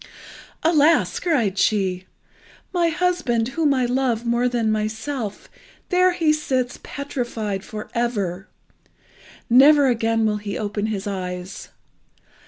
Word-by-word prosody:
"Alas!" 320 0 +3
cried 235 - 0
she, 190 -3 +1 0.7
"my 345 -2 +2
husband, 325 -9 0
whom 295 +2 +1
I 260 -2 +2
love 245 -2 0
more 235 +1 +1
than 230 -3 0
myself, 215 +1 -3 0.4
there 365 0 +3
he 320 -3 +2
sits 260 -5 -2
petrified 240 -8 -4
for 215 -2 -7
ever. 200 -6 -2 1.0
Never 275 +3 +6
again 225 -1 +1
will 210 -1 +1
he 205 -1 -5
open 205 0 -2
his 210 -2 -3
eyes! 185 -2 -5
235 Hz, 115 wpm, -22 LUFS, 210-285 Hz, 1.0 s, Never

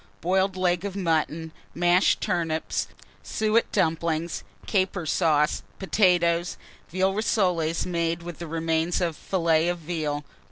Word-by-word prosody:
Boiled 190 +2 +1
leg 180 -1 +1
of 200 -1 -4
mutton, 160 -3 -1 0.2
mashed 175 +2 +3
turnips, 165 -2 -1 0.3
suet 220 +1 +1
dumplings, 165 -2 0 0.2
caper 190 -3 0
sauce, 155 -2 +2 0.2
potatoes, 175 -3 +2 0.3
veal 190 +3 +1
rissoles 180 -6 +1
made 170 -1 -1
with 175 -1 -8
remains 165 +1 0
of 170 -3 -1
fillet 165 -2 +1
of 175 - -1
veal. 155 -3 -3
170 Hz, 115 wpm, -25 LUFS, 160-185 Hz, 0.3 s, mashed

